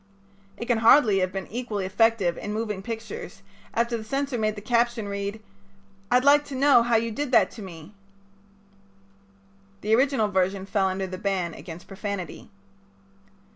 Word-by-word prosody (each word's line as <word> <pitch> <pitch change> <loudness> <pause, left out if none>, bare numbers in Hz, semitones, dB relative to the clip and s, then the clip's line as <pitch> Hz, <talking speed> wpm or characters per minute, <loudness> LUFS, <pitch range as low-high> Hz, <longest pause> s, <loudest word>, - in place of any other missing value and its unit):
It 235 - -5
can 240 -2 +1
hardly 225 -3 +6
have 185 0 0
been 195 0 -4
equally 220 -4 -3
effective 200 -2 +2
in 205 - -5
moving 210 -2 -3
pictures 220 -3 -7 0.3
after 235 +1 0
the 220 - -7
censor 275 +4 -2
made 215 -2 0
the 205 - -8
caption 235 0 +1
read: 200 +1 -4 0.7
"I'd 250 +1 +4
like 290 +1 +6
to 280 - -7
know 275 -2 +5
how 235 0 +1
you 225 +1 +1
did 285 +4 -3
that - - +5
to 225 - -10
me." 175 -1 -10 1.9
The 215 +1 0
original 260 -3 +3
version 190 0 0
fell 195 -1 +1
under 190 0 -2
the 185 0 -7
ban 190 -4 -1
against 170 +1 -10
profanity. 200 -2 -6
215 Hz, 160 wpm, -25 LUFS, 195-235 Hz, 1.9 s, hardly